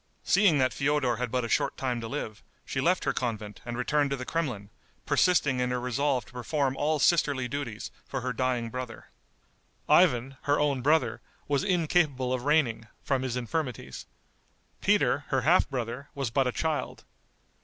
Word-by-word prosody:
Seeing 195 -6 +4
that 130 -1 +2
Feodor 140 -4 +1
had 125 0 -2
but 125 0 -1
a - - -3
short - - 0
time 125 -3 -2
to 115 - -5
live, 110 -5 -5 0.2
she - - -2
left - - +2
her - - +1
convent 110 -4 -4
and 120 0 -4
returned 145 +3 +1
to 140 - 0
the 125 -1 -6
Kremlin, 125 -12 -3 0.3
persisting 145 -8 +3
in 125 0 +1
her 125 0 -1
resolve 125 +1 0
to - - -18
perform 135 +2 -1
all 155 +2 +1
sisterly 145 -4 +2
duties 125 -5 -5 0.2
for 135 - -3
her 125 +1 -2
dying 125 -2 -1
brother. 125 -2 -7 0.8
Ivan, 135 -6 +4
her 145 +1 +1
own 145 -3 +1
brother, 150 +4 +2 0.3
was 140 -1 +1
incapable 160 -8 +1
of 125 0 -3
reigning, 130 -7 +2 0.2
from 135 -2 0
his 130 -2 -2
infirmities. 125 +1 -4 0.7
Peter, - - +2
her - - +1
half - - +4
brother, 125 +1 -4
was 135 -5 -2
but 135 +1 +2
a - - +1
child. 160 +3 -2
130 Hz, 175 wpm, -28 LUFS, 125-145 Hz, 0.8 s, Seeing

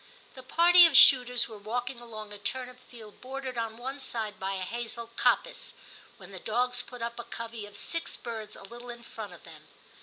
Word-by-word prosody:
The 260 - -10
party 345 +6 +7
of 300 -5 +4
shooters 250 -3 +7
were 220 -2 -10
walking 245 +4 -3
along 215 -3 -8
a 205 - -9
turnip 250 +4 -4
field 220 -4 -13
bordered 265 0 -5
on 225 -1 -3
one 265 +4 -5
side 220 -5 -3
by 195 +1 -2
a 190 - -3
hazel 235 +2 -5
coppice, - - +1 0.4
when - - -13
the - - -8
dogs 245 +3 0
put 245 -2 -9
up 235 0 -4
a. - - -4
covey 230 -2 -7
of 205 0 -10
six 335 +9 -2
birds 225 -3 -7
a - - -12
little 240 +4 -10
in 235 0 -8
front 215 -5 -8
of 175 - -14
them. - - -14
235 Hz, 205 wpm, -29 LUFS, 220-250 Hz, 0.4 s, party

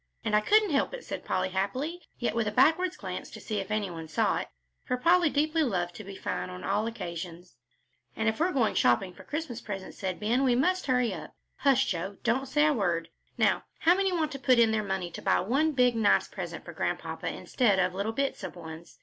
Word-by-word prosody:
"And 215 -1 +2
I 210 - +5
couldn't 420 - +4
help 285 - +1
it," - - -10
said - - -5
Polly, - - 0
happily, 255 - -2 0.2
yet 240 - -1
with 230 -1 0
a - - 0
backward 325 +9 +3
glance - - -6
to - - -10
see 215 -2 -3
if 195 - -5
any 210 -3 -1
one 165 -1 -7
saw 155 - +1
it, - - -5 0.4
for 250 - -1
Polly 340 +4 +4
deeply 310 +3 +1
loved 180 - 0
to 215 - -9
be 195 0 -9
fine 90 - -3
on 90 0 -8
all 215 - 0
occasions. 175 - -6 0.6
"And 220 - -1
if 220 +4 0
we 335 - +3
are - - -2
going 245 -8 +2
shopping 150 +10 +2
for - - -13
Christmas 295 -6 -4
presents," 195 -3 -7
said 185 -2 -3
Ben, 235 +5 +1
"we 250 -2 +3
must 365 +8 +1
hurry 250 -5 +2
up. 155 -3 -9 0.2
Hush, 270 -2 +3
Joe, 190 +3 -3
don't 265 +3 +1
say 295 +3 +3
a 305 - +4
word. 170 - 0 0.3
Now - - +2 0.2
how 340 - +6
many 385 0 +1
want 320 -4 0
to 275 - -6
put 255 -1 +4
in 230 -1 +5
their 220 -1 +1
money 190 -3 -3
to - - -8
buy - - +3
one 275 - +1
big, 250 -3 +3
nice 220 -3 +3
present - - -7
for - - -8
Grandpapa - - -3
instead 225 -7 +1
of 180 -1 +2
little 200 +4 -2
bits 275 -1 -2
of 185 - -6
ones? 165 -1 -10
225 Hz, 235 wpm, -29 LUFS, 190-280 Hz, 0.6 s, how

